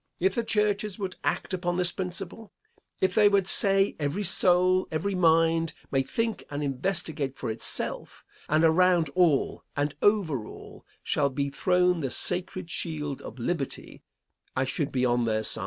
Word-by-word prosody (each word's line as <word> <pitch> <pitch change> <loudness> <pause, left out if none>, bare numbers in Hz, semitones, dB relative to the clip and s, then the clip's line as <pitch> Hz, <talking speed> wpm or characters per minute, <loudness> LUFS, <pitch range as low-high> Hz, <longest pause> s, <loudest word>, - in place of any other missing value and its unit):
If 190 +2 +1
the 235 - -1
churches 210 -2 0
would 190 -3 -5
act - - -2
upon 175 -1 -2
this 180 0 +1
principle, 190 +4 -6 0.5
if 190 -1 +1
they 210 0 +5
would 200 -2 +1
say 195 0 +4
every 150 +7 -2
soul, 185 0 +4
every 190 +6 -2
mind, 165 -2 +2 0.2
may 135 - +2
think 225 - -3
and 145 0 -4
investigate 145 -1 -2
for - - -4
itself; 110 - 0 0.2
and 155 +2 +2
around 170 -1 +3
all, 170 -7 +1
and 145 0 -1
over 170 - +1
all, - - -13 0.2
shall 140 -1 +1
be 140 +1 -3
thrown 180 +2 +1
the 135 -4 -2
sacred 180 +4 -1
shield 150 -6 -4
of - - -10
liberty, 135 +3 -4 0.5
I 130 - 0
should 145 +2 -3
be 130 -1 0
on 120 -1 +1
their 110 -1 -1
side. - - -4
175 Hz, 160 wpm, -26 LUFS, 145-190 Hz, 0.5 s, they